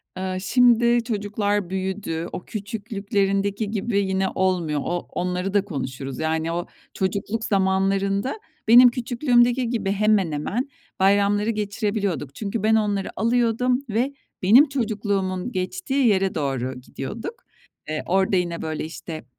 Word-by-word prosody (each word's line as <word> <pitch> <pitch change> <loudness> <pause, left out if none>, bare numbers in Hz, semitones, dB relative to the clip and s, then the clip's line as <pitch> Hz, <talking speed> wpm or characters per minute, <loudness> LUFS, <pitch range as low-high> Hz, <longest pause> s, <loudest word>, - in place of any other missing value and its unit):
Iıı, 185 0 -3
şimdi 240 +2 +4
çocuklar 205 -3 -1
büyüdü. 190 -3 -3
O 180 - -6
küçüklüklerindeki 200 -1 -2
gibi 210 0 0
yine 190 -1 0
olmuyor. 175 -5 +1
O 175 0 -1
onları 180 +2 -2
da 205 -1 +2
konuşuruz. 135 -6 -5
Yani, 160 +1 -1
o 175 +1 -2 0.3
çocukluk 200 +4 -2
zamanlarında 195 - +1 0.3
benim 245 +2 +9
küçüklüğümdeki 245 0 +2
gibi 210 -5 -1
hemen 205 -4 +2
hemen 205 - -2 0.3
bayramları 200 +2 +3
geçirebiliyorduk. 205 - -2
Çünkü 210 0 -3
ben 220 +1 +4
onları 205 -3 0
alıyordum 240 +2 +2
ve 240 +6 0 0.3
benim 245 +11 +6
çocukluğumun 205 -5 -1
geçtiği 265 - 0
yere 195 -3 +2
doğru 130 -3 -2
gidiyorduk. 220 - -7 0.5
Eee, 155 0 -2
orada 190 +1 +2
yine, 175 -2 -1
böyle, 155 -1 -3
işte, 160 -2 -8
200 Hz, 125 wpm, -23 LUFS, 185-225 Hz, 0.5 s, benim